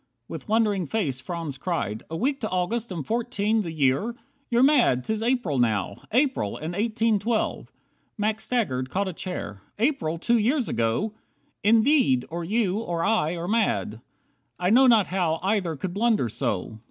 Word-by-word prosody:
With 160 +1 -8
wondering 210 -5 +2
face 145 - -1
Franz 150 -1 -5
cried, 115 - -2
"A 165 - -4
week 275 - -1
to 220 - -2
August, 205 +5 -1
and 165 -6 -4
fourteen 225 -2 0
The 170 -5 -4
year! 155 - +1 0.3
You're 240 +1 +3
mad, 250 - +4
'tis 220 0 -2
April 230 - 0
now. 105 -4 0
April, 255 - +1
and 160 +3 -5
eighteen 220 +1 +1
twelve." 220 +2 -2 0.5
Max 215 +1 -1
staggered, 130 - -1
caught 195 +5 -1
A 185 - -3
chair, 130 - -6 0.2
"April 220 - 0
two 235 +7 +2
years 245 +3 +1
ago! 115 - 0 0.5
Indeed, 225 - +4
Or 170 +1 -3
you, 205 +1 0
or 170 -7 -2
I, 195 -6 +1
are 170 0 -4
mad. 115 - 0 0.6
I 180 +2 +1
know 260 +3 +6
not 225 -5 +5
how 175 -4 0
Either 190 -5 0
could 175 +5 -5
blunder 210 - +2
so." 110 -3 -3
195 Hz, 165 wpm, -25 LUFS, 155-225 Hz, 0.6 s, know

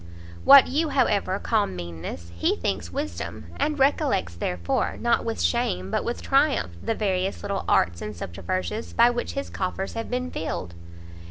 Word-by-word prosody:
What 275 -1 +10
you, 305 +4 0
however, 210 -8 +2
call 215 0 +1
meanness, 85 -1 -7
he 85 - +1
thinks 85 0 -2
wisdom, 85 -5 -5
and 300 0 0
recollects, 270 - +2
therefore, 85 0 -1
not - - +2
with - - -3
shame 90 +2 0
but - - 0
with 240 - -4
triumph, 275 - +2
the 225 - -1
various 190 -2 -1
little 200 -1 -2
arts 85 -1 +2
and 105 0 -5
subterfuges 185 - -4
by 235 +1 +5
which 240 0 -3
his 275 - -4
coffers 190 +1 -3
have 225 0 -4
been 250 +1 -2
filled." 90 - -4
190 Hz, 160 wpm, -25 LUFS, -, -, What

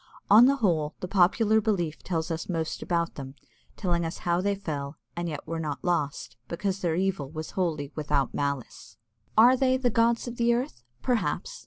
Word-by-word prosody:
On 225 +5 +9
the 275 - +4
whole, 165 - 0
the 180 - -4
popular 205 +4 +3
belief 175 -8 -1
tells 165 -2 -2
us 165 +2 -4
most 165 -3 -2
about 170 -1 -1
them, 135 -1 -8 0.4
telling 175 -4 0
us 165 0 -4
how 175 0 +2
they 200 +1 +1
fell, 145 -7 -5 0.2
and 170 0 -2
yet 150 -2 -6
were 165 +1 -4
not 150 -3 -4
lost, 160 -5 -1
because 190 +3 -2
their 170 -4 0
evil 185 -6 -1
was 155 +1 -6
wholly 155 -6 -2
without 150 -2 0
malice. 140 -3 -4 0.4
Are 240 +4 +8
they 260 0 +2
"the 250 -2 +1
gods 230 +2 +2
of 240 0 -6
the 235 0 +3
earth?" 235 - -3 0.2
Perhaps! 250 - -1
175 Hz, 185 wpm, -27 LUFS, 155-220 Hz, 0.4 s, On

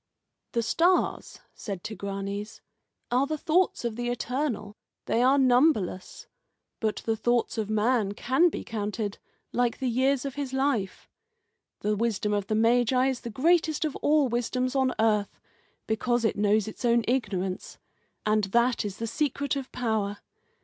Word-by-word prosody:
"The 235 -2 +1
stars," 345 +10 +1
said 195 -5 -6
Tigranes, 200 0 -5 0.5
"are 255 +3 +2
the 310 +1 -2
thoughts 325 -3 +1
of 230 -2 -2
the 240 0 -2
Eternal. 245 -4 -2 0.3
They 230 - +1
are 265 +3 +5
numberless. 250 - +2 0.5
But 215 -2 -2
the 225 - +1
thoughts 240 +1 0
of 215 -1 -2
man 215 -1 +1
can 265 +11 +3
be - - -5
counted, 210 -2 -4 0.3
like 245 -1 +1
the 265 - -2
years 260 +2 +1
of 275 - -3
his 275 -2 -4
life. 265 -8 -1 0.7
The 210 0 +1
wisdom 210 -1 0
of 205 -1 -1
the 215 - 0
Magi 245 +3 +3
is 260 -2 -2
the 235 - -6
greatest 315 +6 +2
of 300 - -3
all 295 -2 +3
wisdoms 250 +2 -1
on 265 -1 +2
earth, 210 -2 +1 0.5
because 240 +2 0
it 220 - +1
knows 210 +1 +2
its 215 - -8
own 235 -1 +3
ignorance. 195 -7 -2 0.5
And 215 -1 +2
that 235 +5 +2
is 205 -1 -5
the 230 - -3
secret 280 +3 -1
of 270 -2 -5
power. 215 -4 -1
235 Hz, 155 wpm, -27 LUFS, 210-260 Hz, 0.7 s, are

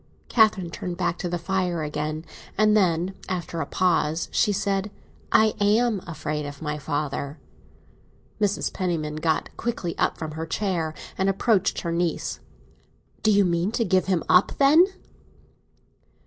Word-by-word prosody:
Catherine 215 -7 +3
turned 175 0 -5
back 170 -1 -1
to 175 - -2
the 175 - -1
fire 180 -2 -1
again, 155 +1 -3 0.3
and 215 0 +4
then, 180 -2 +2 0.2
after 175 -2 -3
a - - -3
pause, 170 -3 +1
she 210 - +2
said—"I 205 +2 0
am 210 0 +2
afraid 150 -2 -3
of 145 0 -8
my 150 -1 -3
father." 145 0 -3 1.0
Mrs. 205 -1 0
Penniman 160 -5 -2
got 160 0 -1
quickly 225 -8 -3
up - - +1
from 160 -1 -5
her 160 +1 -5
chair 165 -4 -1 0.2
and 190 +1 +2
approached 195 0 +1
her 170 - -3
niece. 170 0 -1 0.8
"Do 215 - +2
you 200 -1 +5
mean 170 +3 +1
to 230 - +1
give 185 -1 +2
him 185 -4 +1
up, 180 - +5
then?" 305 +6 +6
175 Hz, 145 wpm, -25 LUFS, 160-205 Hz, 1.0 s, then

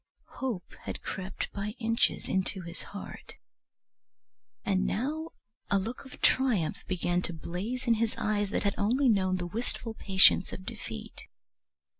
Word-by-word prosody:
Hope 235 -9 -3
had - - -5
crept 190 0 -4
by 210 +2 -3
inches 230 -1 +1
into 190 0 0
his 170 0 -7
heart, 200 - -8 1.3
and 190 -2 +2
now 305 +8 -1 0.4
a 200 - +4
look 225 +8 -3
of 265 - -12
triumph 235 -12 +3
began 175 -1 +1
to 175 - -3
blaze 195 +10 -4
in 235 - +5
his 225 0 +1
eyes 205 -1 +1
that - - 0
had 200 -1 +2
only 250 +6 +4
known 190 -4 +3
the 175 - -3
wistful 225 +4 -4
patience 190 -3 +5
of 185 - -7
defeat. 215 - -6
205 Hz, 145 wpm, -30 LUFS, 185-230 Hz, 1.3 s, in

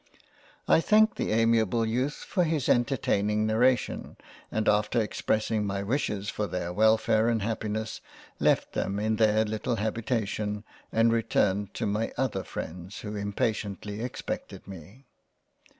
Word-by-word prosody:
I - - +5
thanked 220 +4 +4
the - - -1
amiable 115 0 +3
Youth 125 +6 -2
for 180 - +1
his 155 -5 0
entertaining 105 -4 +2
narration, 120 +4 +1 0.3
and 110 0 -1
after 105 +3 +3
expressing 110 0 0
my 100 -1 -2
wishes 105 -3 -1
for 105 +1 -2
their 90 0 -3
Welfare 110 +2 +3
and 115 -2 +1
Happi 110 0 -2
ness, 110 +1 -4 0.4
left - - +2
them 100 +1 -1
in 110 +1 0
their 110 0 +3
little 110 +3 -2
Habitation 110 -1 -2 0.3
and 115 +1 +3
returned 100 -3 +1
to 115 - -2
my 105 +2 -1
other 130 -7 0
Freinds 90 +4 -7
who 105 0 -5
impatiently 105 0 -2
expected 125 -5 -5
me. 100 - -11
110 Hz, 135 wpm, -28 LUFS, 105-115 Hz, 0.4 s, I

